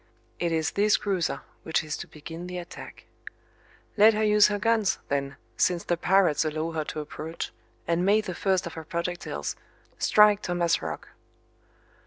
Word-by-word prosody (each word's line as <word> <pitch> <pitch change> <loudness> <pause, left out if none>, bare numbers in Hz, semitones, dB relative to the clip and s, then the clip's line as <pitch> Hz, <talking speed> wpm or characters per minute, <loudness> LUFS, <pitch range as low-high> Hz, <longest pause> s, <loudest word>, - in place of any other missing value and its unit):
It 170 -1 0
is 160 -1 0
this 205 +1 +3
cruiser 190 -5 -1 0.2
which 160 - 0
is 155 -1 -4
to - - -7
begin 165 +3 -9
the 180 0 -5
attack. 175 -1 -9 0.9
Let 215 +1 +7
her 215 - +1
use 210 -1 +6
her 205 - -1
guns, 220 -1 +2
then, 140 -1 -1 0.2
since 180 -2 +2
the 175 - 0
pirates 180 -3 +3
allow 155 +1 -2
her 160 -1 -2
to 155 - -4
approach, 155 +2 -6 0.4
and 170 +1 +1
may 205 +3 +4
the 190 -4 -5
first 190 +1 0
of 170 - -6
her 160 - -7
projectiles 170 - -4 0.4
strike 210 -1 +5
Thomas 175 -1 +1
Roch! - - -6
175 Hz, 165 wpm, -27 LUFS, 160-200 Hz, 0.9 s, Let